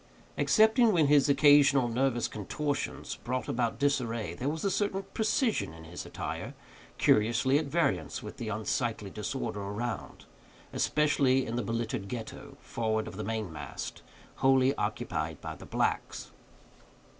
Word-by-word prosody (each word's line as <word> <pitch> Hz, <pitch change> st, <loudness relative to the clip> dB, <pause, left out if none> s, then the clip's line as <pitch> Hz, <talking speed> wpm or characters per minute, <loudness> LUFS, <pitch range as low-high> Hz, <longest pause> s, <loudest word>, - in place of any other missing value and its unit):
Excepting 220 Hz, +1 st, +4 dB
when 165 Hz, -4 st, +4 dB
his 145 Hz, 0 st, +4 dB
occasional 140 Hz, -2 st, +6 dB
nervous 120 Hz, 0 st, +1 dB
contortions 145 Hz, +8 st, -3 dB
brought 125 Hz, +2 st, -3 dB
about 120 Hz, -1 st, -1 dB
disarray, 120 Hz, -, 0 dB
there 125 Hz, +10 st, -2 dB
was 160 Hz, +5 st, -3 dB
a 195 Hz, -, +2 dB
certain 195 Hz, -1 st, 0 dB
precision 220 Hz, -, 0 dB
in 80 Hz, -, -12 dB
his 85 Hz, +2 st, -8 dB
attire -, -, -5 dB, 0.4 s
curiously 120 Hz, +6 st, +3 dB
at 155 Hz, -, -3 dB
variance 115 Hz, -, 0 dB
with -, -, -8 dB
the 115 Hz, -, -4 dB
unsightly 110 Hz, -1 st, -2 dB
disorder 110 Hz, 0 st, -4 dB
around; 105 Hz, +4 st, -5 dB, 0.5 s
especially 140 Hz, -3 st, +2 dB
in 115 Hz, -, -4 dB
the 120 Hz, -, 0 dB
belittered 115 Hz, -3 st, -3 dB
Ghetto, 130 Hz, +5 st, -7 dB
forward 110 Hz, -2 st, -2 dB
of -, -, -8 dB
the 105 Hz, -, -4 dB
main 110 Hz, -4 st, -3 dB
mast, 75 Hz, -3 st, -7 dB, 0.4 s
wholly 135 Hz, 0 st, +4 dB
occupied 105 Hz, -, -3 dB
by -, -, -6 dB
the -, -, -12 dB
blacks. -, -, -2 dB
120 Hz, 140 wpm, -30 LUFS, 110-145 Hz, 0.5 s, occasional